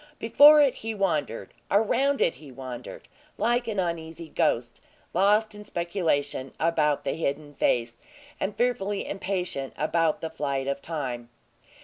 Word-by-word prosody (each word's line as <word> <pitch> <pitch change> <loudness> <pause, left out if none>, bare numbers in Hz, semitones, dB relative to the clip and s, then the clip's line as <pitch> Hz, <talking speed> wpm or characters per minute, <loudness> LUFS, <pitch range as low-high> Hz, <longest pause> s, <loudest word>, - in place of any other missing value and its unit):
Before 290 +6 +7
it 275 - +3
he 225 0 -4
wandered, 150 - -1 0.2
around 265 +7 +2
it - - +2
he 145 -3 -11
wandered, 130 -2 -8 0.3
like 240 +1 +1
an 220 -2 -3
uneasy 165 -2 -4
ghost, 120 -8 0 0.3
lost 210 +4 +3
in 210 0 -10
speculation 165 -8 -2
about 155 -3 +1
the - - -1
hidden 145 -1 -3
face, 120 -3 0 0.4
and 195 +1 -2
fearfully 205 -5 0
impatient 180 -9 -3
about 160 +1 +1
the 160 - -5
flight 140 -4 -2
of 140 0 -2
time. 125 -7 -4
165 Hz, 135 wpm, -26 LUFS, 140-205 Hz, 0.4 s, Before